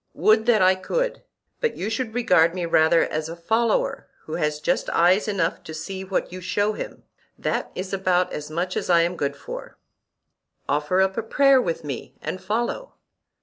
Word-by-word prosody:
Would 220 Hz, +1 st, +3 dB
that 220 Hz, -5 st, +5 dB
I 185 Hz, +1 st, +6 dB
could! -, -, -2 dB, 0.4 s
but 470 Hz, -, -1 dB
you 195 Hz, -, -3 dB
should 225 Hz, 0 st, -3 dB
regard 180 Hz, -8 st, +4 dB
me 180 Hz, -2 st, -2 dB
rather 165 Hz, 0 st, +4 dB
as 155 Hz, +1 st, -3 dB
a 165 Hz, -, -6 dB
follower 225 Hz, +9 st, 0 dB, 0.2 s
who 155 Hz, -, -8 dB
has 150 Hz, -1 st, -1 dB
just -, -, 0 dB
eyes 180 Hz, +5 st, +3 dB
enough 185 Hz, -5 st, -1 dB
to 160 Hz, -2 st, -7 dB
see 190 Hz, +4 st, -5 dB
what 190 Hz, -1 st, -2 dB
you 185 Hz, -, -7 dB
show 205 Hz, +4 st, 0 dB
him—that -, -, -6 dB
is 190 Hz, +1 st, -5 dB
about 185 Hz, -2 st, +1 dB
as 150 Hz, 0 st, -5 dB
much 175 Hz, +4 st, -2 dB
as -, -, -3 dB
I 170 Hz, -1 st, +6 dB
am 170 Hz, +2 st, 0 dB
good 140 Hz, -3 st, -2 dB
for. -, -, -9 dB, 0.9 s
Offer 150 Hz, +6 st, +1 dB
up 190 Hz, 0 st, +1 dB
a -, -, +1 dB
prayer 270 Hz, +4 st, +4 dB
with 165 Hz, -5 st, -3 dB
me 140 Hz, -5 st, -6 dB
and 185 Hz, -, -5 dB
follow. 235 Hz, -, -2 dB
185 Hz, 185 wpm, -24 LUFS, 165-215 Hz, 0.9 s, I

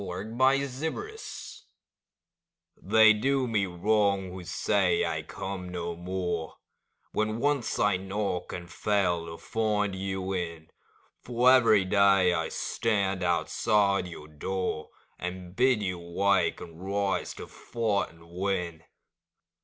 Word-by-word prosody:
OPPORTUNITY 130 Hz, -, -1 dB, 1.7 s
They 110 Hz, 0 st, +6 dB
do 130 Hz, +4 st, +1 dB
me 105 Hz, -4 st, +1 dB
wrong 100 Hz, +1 st, +1 dB
who 90 Hz, 0 st, -7 dB
say 95 Hz, +1 st, +1 dB
I -, -, -2 dB
come 95 Hz, -2 st, -6 dB
no 85 Hz, -1 st, -4 dB
more 90 Hz, -2 st, -3 dB, 0.5 s
When 110 Hz, +1 st, 0 dB
once 140 Hz, -1 st, 0 dB
I 105 Hz, -2 st, +3 dB
knock 95 Hz, -1 st, -3 dB
and 85 Hz, -1 st, -6 dB
fail 90 Hz, -3 st, 0 dB
to 80 Hz, 0 st, -7 dB
find 105 Hz, -3 st, 0 dB
you 95 Hz, 0 st, -3 dB
in; 85 Hz, -3 st, -4 dB, 0.5 s
For 125 Hz, +1 st, +4 dB
every 110 Hz, -6 st, +5 dB
day 95 Hz, -2 st, +4 dB
I 80 Hz, -2 st, -1 dB
stand 100 Hz, -4 st, -1 dB
outside 100 Hz, +3 st, +2 dB
your 80 Hz, -3 st, -9 dB
door, 80 Hz, +1 st, -3 dB, 0.3 s
And 90 Hz, 0 st, -6 dB
bid 125 Hz, -3 st, +3 dB
you 90 Hz, -2 st, -2 dB
wake, 90 Hz, +2 st, +1 dB
and 85 Hz, +1 st, -10 dB
rise 100 Hz, 0 st, -1 dB
to -, -, -7 dB
fight 110 Hz, -4 st, -2 dB
and 85 Hz, 0 st, -18 dB
win. 90 Hz, -2 st, -2 dB
95 Hz, 120 wpm, -28 LUFS, 90-110 Hz, 1.7 s, They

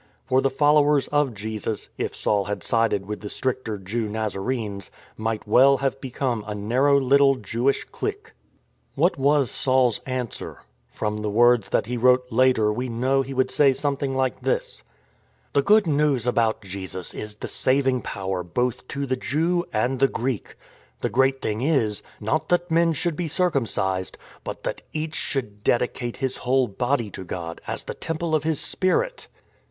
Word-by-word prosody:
For 130 Hz, +1 st, +3 dB
the 135 Hz, -, +2 dB
followers 145 Hz, -1 st, +3 dB
of 145 Hz, -5 st, +1 dB
Jesus 110 Hz, +1 st, -4 dB
— -, -, -41 dB
if -, -, -2 dB
Saul 100 Hz, -2 st, +1 dB
had 105 Hz, +1 st, -4 dB
sided 115 Hz, -4 st, +1 dB
with 105 Hz, +1 st, -5 dB
the 105 Hz, -, -6 dB
stricter 125 Hz, -4 st, -2 dB
Jew 105 Hz, +3 st, -3 dB
Nazarenes 105 Hz, -1 st, -3 dB
— -, -, -26 dB
might 110 Hz, -1 st, -3 dB
well 135 Hz, +5 st, +6 dB
have 135 Hz, 0 st, -2 dB
become 125 Hz, -3 st, -2 dB
a 105 Hz, -, -3 dB
narrow 130 Hz, +7 st, +3 dB
little 135 Hz, +1 st, +4 dB
Jewish 120 Hz, +4 st, 0 dB
clique. 420 Hz, +2 st, -5 dB, 0.6 s
What 175 Hz, -4 st, +2 dB
was 140 Hz, -2 st, +3 dB
Saul's 130 Hz, -3 st, +2 dB
answer? 130 Hz, -2 st, -5 dB, 0.3 s
From 105 Hz, 0 st, -3 dB
the 105 Hz, -, -1 dB
words 120 Hz, -1 st, +4 dB
that -, -, +1 dB
he 120 Hz, +2 st, -3 dB
wrote 125 Hz, +1 st, +4 dB
later 115 Hz, -3 st, +3 dB
we 125 Hz, +3 st, -3 dB
know 130 Hz, +4 st, +1 dB
he 135 Hz, 0 st, -6 dB
would 130 Hz, 0 st, +1 dB
say 140 Hz, -2 st, +4 dB
something 140 Hz, -1 st, -2 dB
like 130 Hz, -3 st, 0 dB
this: -, -, -2 dB, 0.4 s
" -, -, -38 dB
The 140 Hz, -, +4 dB
Good 210 Hz, +6 st, +5 dB
News 145 Hz, -6 st, +2 dB
about 115 Hz, -3 st, +1 dB
Jesus 95 Hz, -1 st, -6 dB
is 105 Hz, -1 st, -6 dB
the -, -, -6 dB
saying 130 Hz, -1 st, +2 dB
power 95 Hz, -2 st, -3 dB
both 125 Hz, +8 st, -2 dB
to 140 Hz, +1 st, -3 dB
the 130 Hz, -1 st, 0 dB
Jew 165 Hz, +7 st, 0 dB
and 125 Hz, +4 st, 0 dB
the 135 Hz, -, +5 dB
Greek. 125 Hz, -3 st, -3 dB, 0.5 s
The -, -, 0 dB
great 135 Hz, +1 st, +2 dB
thing 110 Hz, +1 st, -1 dB
is 125 Hz, -8 st, +1 dB
— -, -, -26 dB
not 155 Hz, -, 0 dB
that 175 Hz, -1 st, +1 dB
men 165 Hz, 0 st, +3 dB
should 170 Hz, +1 st, -1 dB
be 175 Hz, +1 st, -2 dB
circumcised, 115 Hz, -, -1 dB, 0.3 s
but -, -, -6 dB
that -, -, -3 dB
each 155 Hz, 0 st, -3 dB
should 105 Hz, -7 st, -3 dB
dedicate 120 Hz, 0 st, 0 dB
his 130 Hz, -2 st, -2 dB
whole 130 Hz, 0 st, +2 dB
body 120 Hz, +1 st, -1 dB
to 95 Hz, -, -7 dB
God, 85 Hz, -2 st, -6 dB
as -, -, -4 dB
the -, -, -5 dB
Temple 165 Hz, 0 st, -3 dB
of 155 Hz, -1 st, +2 dB
His 160 Hz, -1 st, 0 dB
Spirit." -, -, 0 dB
130 Hz, 180 wpm, -24 LUFS, 110-140 Hz, 0.6 s, well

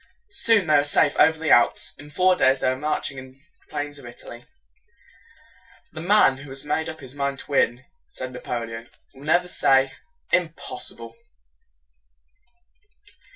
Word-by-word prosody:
Soon 225 Hz, -, +4 dB
they 155 Hz, -, +1 dB
were 145 Hz, -, +3 dB
safe 145 Hz, 0 st, +2 dB
over 160 Hz, 0 st, +5 dB
the 160 Hz, -1 st, -1 dB
Alps. 120 Hz, -, +3 dB
In 145 Hz, -, -12 dB
four 185 Hz, +4 st, +3 dB
days 130 Hz, -5 st, +3 dB
they 130 Hz, -, +1 dB
were -, -, -2 dB
marching 140 Hz, -1 st, -3 dB
on 130 Hz, 0 st, -12 dB
the 135 Hz, -, -29 dB, 0.3 s
plains 145 Hz, -1 st, -5 dB
of -, -, -12 dB
Italy. 120 Hz, 0 st, -11 dB, 1.5 s
"The 155 Hz, -, -8 dB
man 175 Hz, -7 st, +4 dB
who 140 Hz, +1 st, -11 dB
has 135 Hz, +1 st, -4 dB
made 160 Hz, +2 st, -1 dB
up 160 Hz, -1 st, -8 dB
his 130 Hz, -1 st, -10 dB
mind 140 Hz, -1 st, -2 dB
to 145 Hz, -, -8 dB
win," 125 Hz, -1 st, +1 dB, 0.2 s
said 130 Hz, 0 st, -6 dB
Napoleon, 115 Hz, -1 st, -6 dB, 0.2 s
"will 135 Hz, +2 st, -14 dB
never 175 Hz, +3 st, +2 dB
say 135 Hz, -5 st, +2 dB, 0.4 s
'Im 170 Hz, -2 st, +2 dB
pos -, -, -4 dB
si -, -, -5 dB
ble.'" 115 Hz, 0 st, -11 dB
140 Hz, 165 wpm, -23 LUFS, 130-160 Hz, 1.5 s, over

